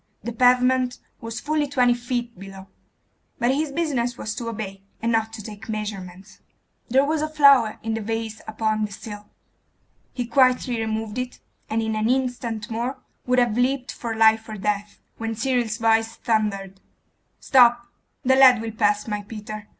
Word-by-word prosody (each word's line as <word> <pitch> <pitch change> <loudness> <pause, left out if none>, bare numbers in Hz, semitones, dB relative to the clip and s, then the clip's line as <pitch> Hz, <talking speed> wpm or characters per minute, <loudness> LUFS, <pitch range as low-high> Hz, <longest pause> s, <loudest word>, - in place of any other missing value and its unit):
The 235 +2 -4
pavement 250 +1 +3 0.2
was 230 0 -6
fully 300 +1 0
twenty 250 -3 +3
feet 240 0 -3
below; 195 0 -11 0.7
but 240 +2 +2
his 295 +1 -1
business 275 -6 -1
was 210 - -4
to 230 +1 -4
obey, 200 -3 -6 0.2
and 230 +1 0
not 225 -1 +1
take 215 0 -9
measurements. 200 -3 -6 0.5
There 265 +3 +4
was 310 +1 0
a 310 - -1
flower 280 -7 +5
in 225 0 -2
the 225 - -2
vase 225 0 -4
upon 215 0 0
the 210 - -8
sill. 205 0 -9 0.8
He 245 - -3
quietly 250 0 +2
removed 220 +1 -3
it, 250 0 -5 0.3
and 225 +1 0
in 220 0 -1
an 215 +1 0
instant 245 -4 -2
more 240 +4 -2 0.3
would 250 0 +2
have 240 -3 +3
leapt 255 +1 0
for 230 -2 -5
life 220 0 +4
or 215 - -6
death, 205 +1 -2 0.2
when 225 0 -3
Cyril's 240 -2 0
voice 225 0 +2
thundered 200 -4 -1 0.6
'Stop!' 240 -2 +5 0.4
'The 260 +1 +5
lad 260 -3 +7
will 225 0 -4
pass, 210 -1 +1
my 210 -1 -2
Peter. 215 0 -8
225 Hz, 165 wpm, -23 LUFS, 215-250 Hz, 0.8 s, lad